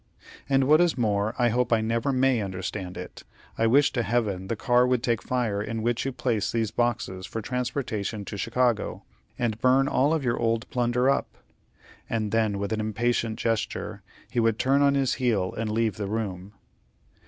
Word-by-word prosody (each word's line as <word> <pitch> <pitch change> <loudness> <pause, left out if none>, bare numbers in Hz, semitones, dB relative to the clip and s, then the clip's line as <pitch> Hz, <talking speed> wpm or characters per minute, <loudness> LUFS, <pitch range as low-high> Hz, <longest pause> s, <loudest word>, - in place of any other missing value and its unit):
"And 135 -1 +4
what 155 +5 +5
is 175 -5 +2
more, 105 -1 0
I 120 -1 +3
hope 125 +2 0
I 115 - +4
never 115 +4 0
may 130 -2 +2
understand 95 -1 -5
it. - - -9 0.3
I 115 - +2
wish 135 +4 +4
to 120 - +1
heaven 105 -4 -1
the 115 - -1
car 125 +2 +3
would 125 -1 +1
take 120 -3 +1
fire 115 -5 -1
in 110 +1 -4
which 120 +1 0
you - - -1
place 115 -5 -1
these 115 -2 -1
boxes 110 -6 -1
for 115 - -4
transportation 115 -3 -3
to 105 - -6
Chicago, 115 +2 0 0.3
and 115 -2 -2
burn 130 +2 +4
all 145 +1 +2
of 160 -3 0
your 120 -2 0
old 115 0 0
plunder 125 +1 +1
up;" 140 - +2 0.8
and 110 -3 -1
then, 110 -3 +1
with 100 +2 -2
an 110 - -1
impatient 110 +1 -1
gesture, 115 -2 -2 0.3
he - - -2
would 115 -1 +2
turn 135 +3 +2
on 140 0 +4
his 135 -2 +1
heel 105 -7 +1
and 110 -1 -2
leave 110 -3 0
the 100 -2 -3
room. 100 -2 -4
115 Hz, 190 wpm, -26 LUFS, 105-125 Hz, 0.8 s, what